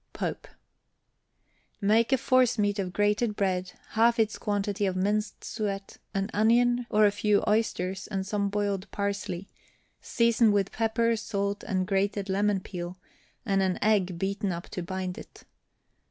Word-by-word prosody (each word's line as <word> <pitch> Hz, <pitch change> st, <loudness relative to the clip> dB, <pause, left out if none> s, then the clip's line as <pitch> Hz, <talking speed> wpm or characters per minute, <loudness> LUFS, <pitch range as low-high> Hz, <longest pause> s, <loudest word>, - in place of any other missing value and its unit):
POPE. -, -, -4 dB, 1.3 s
Make 220 Hz, +4 st, +3 dB
a 265 Hz, -, +5 dB
forcemeat 235 Hz, -6 st, +2 dB
of 185 Hz, -2 st, -2 dB
grated 210 Hz, +2 st, +1 dB
bread, 185 Hz, -2 st, -1 dB, 0.2 s
half 230 Hz, +1 st, +3 dB
its 220 Hz, -2 st, +1 dB
quantity 205 Hz, -1 st, -1 dB
of 185 Hz, -, -1 dB
minced 205 Hz, +3 st, -1 dB
suet, 200 Hz, -3 st, -4 dB, 0.2 s
an 195 Hz, +2 st, -1 dB
onion, 240 Hz, +3 st, +3 dB
or 210 Hz, 0 st, +4 dB
a 205 Hz, -, +5 dB
few 205 Hz, 0 st, +2 dB
oysters 195 Hz, -3 st, 0 dB
and 195 Hz, -2 st, -3 dB
some 200 Hz, 0 st, -1 dB
boiled 200 Hz, -1 st, -2 dB
parsley, 200 Hz, -2 st, -3 dB, 0.5 s
season 235 Hz, -2 st, +3 dB
with 200 Hz, -1 st, +1 dB
pepper, 230 Hz, +1 st, +1 dB
salt, 200 Hz, -2 st, -2 dB
and 185 Hz, -3 st, -1 dB
grated 195 Hz, +1 st, 0 dB
lemon 200 Hz, 0 st, +1 dB
peel, 180 Hz, -1 st, -6 dB, 0.5 s
and 195 Hz, -3 st, +2 dB
an 185 Hz, -1 st, +1 dB
egg 195 Hz, -5 st, +2 dB
beaten 195 Hz, +2 st, -1 dB
up 170 Hz, 0 st, -6 dB
to 180 Hz, -, -4 dB
bind 185 Hz, +1 st, -4 dB
it. -, -, -13 dB
205 Hz, 145 wpm, -28 LUFS, 195-220 Hz, 1.3 s, a